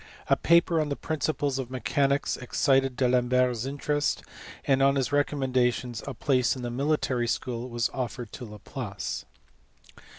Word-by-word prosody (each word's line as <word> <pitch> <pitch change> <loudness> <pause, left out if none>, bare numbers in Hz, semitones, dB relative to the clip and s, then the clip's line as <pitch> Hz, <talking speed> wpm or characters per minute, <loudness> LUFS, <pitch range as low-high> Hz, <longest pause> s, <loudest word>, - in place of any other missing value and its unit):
A - - +8
paper 170 -1 +4
on 150 - -2
the 140 - -1
principles 145 -3 -1
of 130 -2 -4
mechanics 135 +3 +1
excited 135 +1 +1
D 130 - +1
Alembert 125 0 +3
s 120 0 -4
interest, 145 +1 -1 0.4
and 135 -1 +3
on 135 +1 +5
his 135 -2 0
recommendation 130 -4 +1
a 140 - -4
place 130 -1 +2
in 130 - -7
the 120 - -3
military 130 -2 0
school 120 +1 -2
was 120 -1 -1
offered 125 -3 -4
to - - -8
Laplace. 105 -2 -6
130 Hz, 155 wpm, -27 LUFS, 125-140 Hz, 0.4 s, A